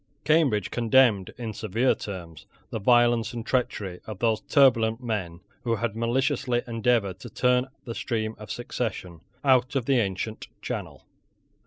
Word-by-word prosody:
Cambridge 140 - +2
condemned, 115 -4 +3
in 115 -2 -5
severe 110 +5 +1
terms, 85 -6 -8 0.2
the 110 - -3
violence 120 +1 +3
and 115 -1 -5
treachery 105 -8 -1
of 110 -3 -6
those 110 0 +1
turbulent 115 -4 +3
men 95 -7 -3 0.2
who 115 -1 +1
had 115 -1 -2
maliciously 120 +1 0
endeavoured 115 -5 0
to - - -9
turn 125 0 +2 0.2
the 115 - -4
stream 110 -2 -2
of 105 - -10
succession 95 -8 -4 0.2
out 130 -1 +3
of 130 -4 0
the 135 -1 +3
ancient 105 +1 -3
channel. - - -6
115 Hz, 145 wpm, -26 LUFS, 105-125 Hz, 0.2 s, condemned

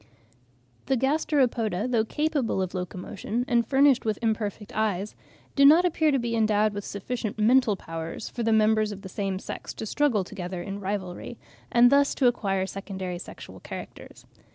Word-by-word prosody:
The 265 -1 +2
Gasteropoda, 250 - +1
though 235 -3 +2
capable 295 -5 -1
of 185 -1 -2
locomotion 185 +5 -4
and 235 -1 +3
furnished 270 -1 +4
with 215 -2 -1
imperfect 215 -2 -2
eyes, 210 -2 -1 0.4
do 280 - +4
not 315 +6 +7
appear 315 -3 +2
to 275 - +3
be 235 -2 -2
endowed 215 -1 +2
with 205 0 -5
sufficient 215 +2 -4
mental 225 0 +4
powers 165 -2 -6
for 240 - -6
the 225 -1 +1
members 215 0 +3
of 200 0 -8
the 190 - -7
same 195 0 -2
sex - - -7
to - - -5
struggle 240 -4 +1
together 180 -2 -6
in 200 +1 -5
rivalry, 195 +3 -4 0.3
and 240 +1 +6
thus 280 0 +4
to 265 - +1
acquire 195 -6 +1
secondary 190 -2 -5
sexual - - -10
characters. - - -10
215 Hz, 165 wpm, -26 LUFS, 195-250 Hz, 0.4 s, not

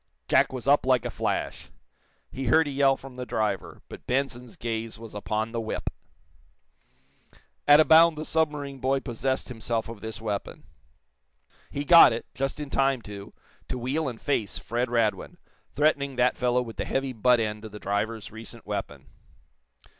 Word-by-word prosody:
Jack - - +4
was 130 -1 -6
up 140 -2 +4
like 130 -2 +3
a - - -3
flash. - - -3 0.6
He 135 - -5
heard 160 +6 +4
a - - -3
yell 135 -1 +3
from 130 -2 -12
the 125 - -4
driver, 110 -4 -2
but - - -12
Benson's 125 -2 -2
gaze 115 -1 -4
was 115 0 -11
upon 110 +2 -2
the 115 -1 -2
whip. 110 - -4 1.8
At 145 +1 +8
a 155 - +6
bound 160 0 +6
the 155 - -4
submarine 150 -4 -1
boy 135 +1 +1
possessed 130 +2 -2
himself 115 -1 -2
of 115 -2 -9
this 110 0 -6
weapon. 105 -3 -4 1.1
He 145 +1 -4
got 165 -6 +9
it, 115 - -5
just 135 +2 -3
in 145 -2 -6
time, 135 -3 +1
too, 100 -1 -9 0.4
to 130 - -3
wheel 130 +5 -1
and 115 -3 -9
face 115 -8 -1
Fred 120 +1 -2
Radwin, 115 -3 0 0.3
threatening 140 -2 +1
that 125 0 +2
fellow 125 0 +1
with 115 -2 -10
the - - -2
heavy 135 -1 -2
butt 120 +2 +3
end 105 -1 -2
of 110 - -8
the 105 - -8
driver's 105 +2 -3
recent 115 +1 -10
weapon. - - -5
125 Hz, 170 wpm, -26 LUFS, 115-135 Hz, 1.8 s, got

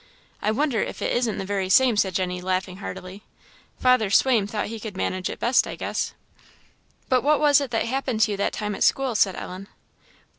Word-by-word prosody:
I - - 0
wonder 240 0 +1
if - - -4
it - - 0
isn't 240 -4 0
the 195 - -4
very 195 -1 -2
same," 250 +3 +5
said 190 -3 +1
Jenny, 180 -1 -1
laughing 185 0 -2
heartily: 190 0 -8 0.6
"Father 255 -5 +3
Swaim 220 -1 +3
thought 210 0 -3
he 225 +1 -6
could 210 -3 -7
manage 185 -1 -2
it - - -6
best, 245 +2 +2
I - - -5
guess." - - -3 0.9
"But 255 -1 +3
what 300 +2 +3
was 290 -1 +5
it 275 - -3
that 225 -1 0
happened 255 -2 -2
to 215 - +3
you 200 - -2
that 200 - -1
time 210 -1 -3
at - - -7
school?" 270 -2 +2
said 195 -3 +2
Ellen. 185 +2 -7
215 Hz, 210 wpm, -24 LUFS, 190-255 Hz, 0.9 s, same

